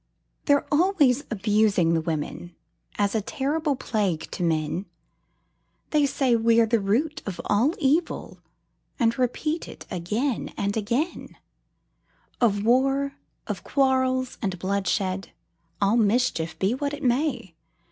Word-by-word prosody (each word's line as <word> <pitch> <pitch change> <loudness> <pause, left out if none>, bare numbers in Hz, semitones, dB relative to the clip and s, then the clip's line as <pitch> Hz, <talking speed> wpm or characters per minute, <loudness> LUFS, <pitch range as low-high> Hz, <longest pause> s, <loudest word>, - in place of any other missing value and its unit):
They're 285 -1 +3
always 295 -5 +3
abusing 205 -5 +2
the 165 - +2
women, 165 +2 -4 0.4
As 200 -1 +1
a 220 - +1
terrible 290 +6 -1
plague 200 -10 -2
to - - -5
men; 165 +2 -1 1.0
They 295 -2 +3
say 265 -3 +2
we're 230 0 +4
the 230 +1 +2
root 245 +11 0
of 195 - -5
all 240 +11 +2
evil, 315 +4 0 0.6
And 230 -3 +2
repeat 305 +6 -1
it - - -11
again 215 +9 -2
and 200 0 -1
again 235 - -2 1.0
Of 205 -3 +2
war, 270 +3 +2 0.3
and - - -5
quarrels, 260 -2 +1
and 190 -5 -2
bloodshed, 190 0 -1 0.5
All 205 +3 +3
mischief, 215 -7 +1
be 195 +4 +1
what 285 +2 -2
it 295 - -11
may. 245 - 0
230 Hz, 125 wpm, -25 LUFS, 200-275 Hz, 1.0 s, we're